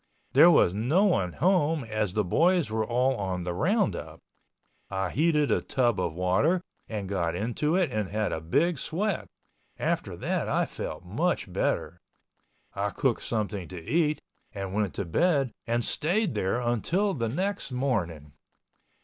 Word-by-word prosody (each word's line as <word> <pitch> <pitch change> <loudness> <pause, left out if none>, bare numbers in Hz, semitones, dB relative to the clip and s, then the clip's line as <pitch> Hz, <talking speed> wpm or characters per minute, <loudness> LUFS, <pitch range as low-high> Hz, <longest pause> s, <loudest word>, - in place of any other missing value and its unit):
There - - +8
was 90 - +5
no 125 - +2
one 95 - +2
home 160 -3 +2
as 110 -4 -2
the 105 0 +1
boys 165 - +2
were 110 0 0
all 125 +3 +1
on 95 -3 -2
the 90 0 -3
roundup. 195 - 0 0.7
I 95 -2 -2
heated 150 -1 +2
a - - +2
tub 120 -6 +1
of 85 -3 -2
water 105 - +2 0.3
and 105 -3 -4
got 85 -4 -1
into 120 - 0
it 185 -3 +2
and 105 -3 -2
had 105 +2 -1
a 80 - -3
big 145 - +1
sweat, 200 +9 -2 0.5
after - - -1
that - - -1
I - - +2
felt - - -6
much - - -1
better, - - -1 0.7
I 100 +1 -1
cooked 130 +3 0
something 105 -5 -3
to 90 - -7
eat 150 - +1 0.3
and 95 -2 -5
went 105 -3 -1
to 100 - -2
bed 140 - +2 0.2
and 120 0 +1
stayed 190 - 0
there 105 +2 0
until 165 - +1
the 115 -7 -2
next 190 - -2
morning. 85 - -2
120 Hz, 160 wpm, -27 LUFS, 95-160 Hz, 0.7 s, There